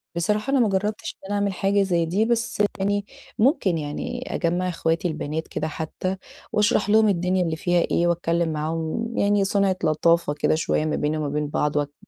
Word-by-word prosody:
بصراحة، 210 +8 0
أنا 275 - +3
ما 225 -4 +3
جربتش 205 +2 -2
إن - - -11
أنا 205 - -2
أعمل 200 -1 0
حاجة 195 +2 +2
زَي 175 -3 +1
دي 190 +7 +1
بس 230 -2 0 0.2
يعني 200 +1 0 0.3
ممكن 215 - +3
يعني 150 -1 -4
أجمّع 175 +2 0
أخواتي 165 +1 0
البنات 155 0 -4
كده 155 - -3
حتى، 160 +4 -4 0.3
وأشرح 210 0 +2
لهم 215 +1 +5
الدنيا 180 -1 +1
اللي 165 -2 -1
فيها 175 +1 +1
إيه 175 - +2
وأتكلم 170 -1 0
معاهم 160 +9 -2
يعني 200 0 +3
صنعة 195 -1 +1
لطافة 165 0 +2
كده 150 - +1
شوية 155 -1 0
ما 155 - 0
بينا 155 +1 -1
وما 150 - -2
بين 150 +1 -1
بعض 150 0 0
واتك 145 -1 -1
175 Hz, 190 wpm, -24 LUFS, 160-205 Hz, 0.3 s, لهم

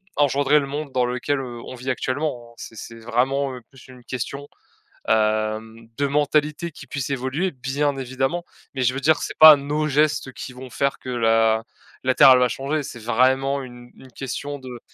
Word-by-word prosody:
engendrer 145 +1 +3
le 140 - -5
monde 145 +1 -5
dans 125 -1 +2
lequel, 125 +3 -1
heu, 120 -2 -7
on - - -8
vit 125 +1 -6
actuellement, 130 -2 -2
hein. - - -19
C'est - - -10
c'est 115 - -9
vraiment, 130 +4 0
heu, 125 - -7
plus 135 - -17
une 125 -1 -14
question, 140 +3 -5 0.6
hem, 110 +1 0
de 140 - +1
mentalité 150 +3 0
qui - - -13
puisse 140 -2 -4
évoluer, 140 +7 -1
bien 135 +1 -1
évidemment, 135 +6 -2 0.3
mais 130 -2 -1
je 125 +1 +2
veux 135 - -4
dire 155 +3 +4
que - - -6
c'est - - -7
pas 155 -1 +10
nos 145 +2 -2
gestes 150 -1 +1
qui 130 - -8
vont 130 +1 -10
faire 140 +3 -1
que 130 - -9
la 115 -2 +2 0.4
la 130 0 +2
terre, - - +8
elle 130 - +7
va 125 - +4
changer, 140 +5 -2
c'est 120 - -8
vraiment 130 +4 +2
une 120 -1 -12
une 130 -1 -15
question 140 +2 -5
de 125 -2 -9
130 Hz, 200 wpm, -22 LUFS, 120-145 Hz, 0.6 s, pas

